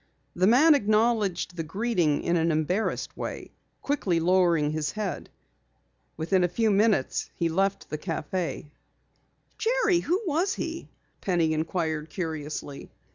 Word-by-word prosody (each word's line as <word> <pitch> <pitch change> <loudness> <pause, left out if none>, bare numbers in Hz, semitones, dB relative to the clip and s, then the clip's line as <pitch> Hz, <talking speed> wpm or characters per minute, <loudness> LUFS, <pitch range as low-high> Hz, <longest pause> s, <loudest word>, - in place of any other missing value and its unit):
The 185 +2 +3
man 285 +8 +6
acknowledged 215 -7 +1
the 165 - -3
greeting 180 -4 0
in 170 - +1
an 165 0 +2
embarrassed 165 +7 -1
way, - - -6 0.3
quickly 195 -12 0
lowering 170 -3 +3
his 155 -1 -2
head. 210 -3 -4 0.9
Within 180 +4 +1
a - - +4
few 215 +5 +1
minutes 205 -8 +1
he 170 - 0
left 195 +4 0
the 155 - -3
café. 165 +1 -3 0.9
"Jerry, 450 -6 +2
who 355 +2 0
was 360 +4 0
he?" 330 0 -5 0.3
Penny 170 -4 +1
inquired 160 -1 -2
curiously. 150 -4 -5
180 Hz, 130 wpm, -27 LUFS, 160-225 Hz, 0.9 s, man